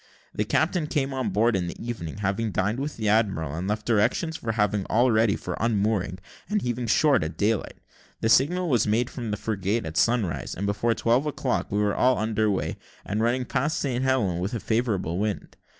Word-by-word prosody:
The - - -1
captain 170 -5 +1
came 140 -3 -1
on 130 -5 -1
board 110 +4 +2
in 90 -2 -1
the - - -7
evening, 105 -8 -5
having 105 +2 -1
dined 105 +6 0
with 145 +2 -4
the 110 -2 -2
admiral, 100 -9 +1
and 85 +4 -3
left 105 +1 -2
directions 120 +9 +1
for 115 -7 -3
having 105 -2 +1
all 120 +3 +3
ready 110 -1 +3
for - - -5
unmooring 105 -4 0 0.3
and 210 0 +1
heaving 120 - -2
short 135 - +4
at 80 +2 -5
daylight. 105 0 0 0.4
The - - 0
signal 170 +10 +3
was 125 -9 +2
made 115 +4 +1
from 120 -4 -5
the 105 - -2
frigate 105 +1 -1
at 80 +1 -5
sunrise, 115 -8 +1
and 100 - -3
before 105 +3 +1
twelve 120 +6 +2
o'clock 135 -3 -2
we 100 - 0
were 105 -1 +2
all 130 0 +3
under 110 0 +1
weigh, 100 - -1 0.3
and 105 +2 -1
running 125 +2 +1
past 150 +6 -1
St. 130 -3 -1
Helen's 105 -10 +1
with 100 +7 -2
a - - -2
favourable 105 -7 -1
wind. 105 -1 -3
110 Hz, 205 wpm, -25 LUFS, 100-125 Hz, 0.4 s, short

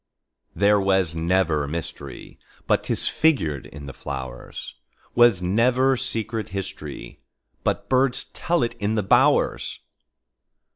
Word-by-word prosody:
There 100 +1 +4
was 95 -4 +2
never 80 -3 +1
mysteryBut 70 -3 -4
'tis - - 0
figured 80 - +1
in 75 0 -10
the 70 - -8
flowers; 65 -4 -7 0.4
SWas 120 -7 +5
never 125 +8 +3
secret 115 -4 -2
historyBut 95 -10 -6
birds 130 0 +2
tell 170 -6 0
it 120 0 -1
in 105 +2 0
the 105 - 0
bowers. 95 - +2
100 Hz, 105 wpm, -24 LUFS, 80-120 Hz, 0.4 s, SWas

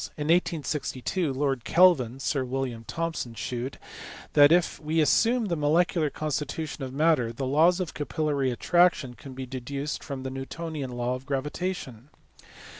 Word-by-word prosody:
In 150 0 -3
1862 165 -1 0
Lord 135 -2 -1
Kelvin 145 -9 +4
(Sir 135 0 0
William 125 -2 -3
Thomson) 165 -8 -3
shewed 125 +4 -4 0.6
that, 145 0 +7
if 175 0 +3
we 160 +1 -1
assume 225 - +3
the 175 -4 -1
molecular 155 +1 +2
constitution 150 0 -3
of 130 - -5
matter, 140 -4 +2
the 130 +3 -4
laws 160 +7 +4
of 180 -3 -3
capillary 145 -2 -1
attraction 155 0 +2
can 130 +1 -11
be 130 0 -5
deduced 135 +3 -5
from 135 -3 -6
the 130 - -4
Newtonian 140 +1 -5
law 120 0 -2
of 130 +1 -7
gravitation. 140 -2 -4
145 Hz, 145 wpm, -27 LUFS, 130-165 Hz, 0.6 s, that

